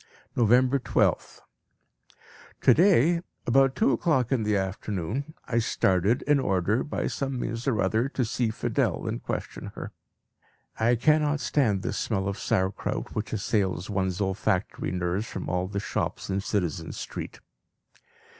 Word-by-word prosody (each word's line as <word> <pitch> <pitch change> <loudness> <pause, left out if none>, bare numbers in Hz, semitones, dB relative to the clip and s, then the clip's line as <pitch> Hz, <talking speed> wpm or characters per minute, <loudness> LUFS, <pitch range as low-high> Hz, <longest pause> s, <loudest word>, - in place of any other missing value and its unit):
November 125 +3 +4
12th. - - 0 1.2
To - - +6
day 170 -2 +4 0.2
about 135 +2 +4
two 135 - +3
o'clock 130 -2 +1
in 130 -4 +2
the 105 -1 +1
afternoon 100 - -3
I 115 -1 +1
started 100 0 +2
in 145 -1 +3
order, 100 0 +1
by 150 - -3
some 135 -2 -2
means 115 +3 -4
or 115 -6 +1
other, 115 +4 +1
to 130 -3 -1
see 115 +1 0
Fidel 110 - -1
and - - -3
question - - -5
her. - - -6 0.9
I 115 +2 +4
cannot 150 +3 +3
stand 110 -11 +1
this - - -2
smell 95 -4 -1
of 100 - -3
Sauerkraut 95 +1 -1
which 110 - -3
assails 100 -3 -1
one's 95 -2 -1
olfactory 100 0 -1
nerves 90 +4 -1
from - - -5
all 90 +1 -1
the 100 +1 -3
shops 100 - -3
in 95 +1 0
Citizen 90 -7 -2
Street. - - -6
110 Hz, 145 wpm, -27 LUFS, 95-130 Hz, 1.2 s, To